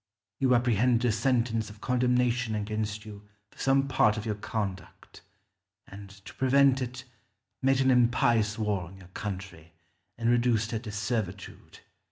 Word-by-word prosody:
You 130 -2 +3
apprehended 120 0 +2
a - - +3
sentence 115 -1 0
of 105 0 -13
condemnation 125 -2 +1
against 105 0 -3
you 105 -1 -11 0.2
for - - -21
some 135 0 +2
part 110 -5 +3
of 110 - -5
your 110 - -1
conduct, 100 -2 -6 0.7
and, 100 0 -11
to 95 0 -13
prevent 135 0 +3
it, 125 0 -5 0.6
made 135 0 +3
an 130 0 +4
impious 120 -3 +2
war 105 -3 -1
on 95 +3 -13
your 90 -2 -15
country, 90 -4 -7 0.4
and 115 0 -2
reduced 120 -2 +2
her 115 - -2
to 110 -2 -8
servitude. 105 -3 -5
115 Hz, 150 wpm, -28 LUFS, 105-125 Hz, 0.7 s, an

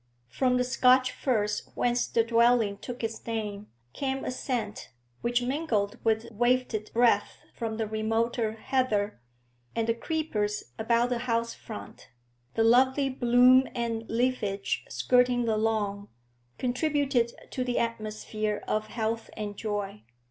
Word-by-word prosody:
From 250 - +1
the 250 - +2
Scotch 255 0 +4
firs 210 -5 -1
whence 245 0 +1
the 230 - +2
dwelling 230 -3 +3
took 245 +1 -7
its 225 0 -3
name 210 -2 -3 0.3
came 270 -1 -2
a - - -1
scent 240 -5 -3 0.3
which 240 +1 +1
mingled 245 -6 -1
with 225 0 +1
wafted 240 -1 +1
breath 240 0 +3 0.2
from 225 -2 -4
the 225 - -1
remoter 220 +1 0
heather, 220 - -1 0.5
and 230 -1 +1
the 230 - +3
creepers 230 -7 -2 0.2
about 235 +2 +2
the 245 -1 -1
house 230 0 0
front, 220 - -10 0.5
the 225 - +3
lovely 260 +4 +4
bloom 250 +1 +5
and 230 -2 -2
leafage 225 -5 0
skirting 250 -1 +2
the 220 -1 +1
lawn, 210 -2 -1 0.5
contributed 265 -2 +1 0.2
to 255 - -2
the 250 -1 -1
atmosphere 215 -2 -2
of 215 0 -1
health 225 0 -3
and 205 -1 -4
joy. 205 - -4
230 Hz, 135 wpm, -28 LUFS, 215-250 Hz, 0.5 s, bloom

